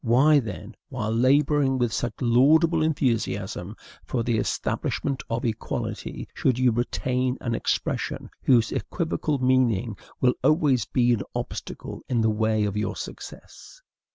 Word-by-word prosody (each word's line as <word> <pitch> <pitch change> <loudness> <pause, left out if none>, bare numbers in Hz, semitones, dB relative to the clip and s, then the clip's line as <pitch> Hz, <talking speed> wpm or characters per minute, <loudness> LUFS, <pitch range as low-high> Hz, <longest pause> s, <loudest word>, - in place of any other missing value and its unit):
Why, 135 +6 +5
then, 110 -2 -7 0.2
while 110 -5 -3
laboring 135 +2 +3
with 120 -3 0
such 120 - -2
laudable 155 +7 +4
enthusiasm 110 - -1 0.3
for 120 -3 -2
the 115 -2 0
establishment 135 +4 -2
of 115 +1 -2
equality, 110 -2 -4
should 130 -3 +1
you 130 -1 +3
retain 125 +2 -1
an 120 - -3
expression - - -2
whose 120 -3 +3
equivocal 160 -3 -2
meaning 125 -5 +2 0.2
will 125 -1 +3
always 145 - +3
be 120 -1 +2
an 110 - -1
obstacle - - -6
in 125 -3 +1
the 110 0 +3
way 110 0 +1
of 100 -1 -1
your 105 +1 -2
success? - - -10
125 Hz, 135 wpm, -25 LUFS, 115-135 Hz, 0.3 s, Why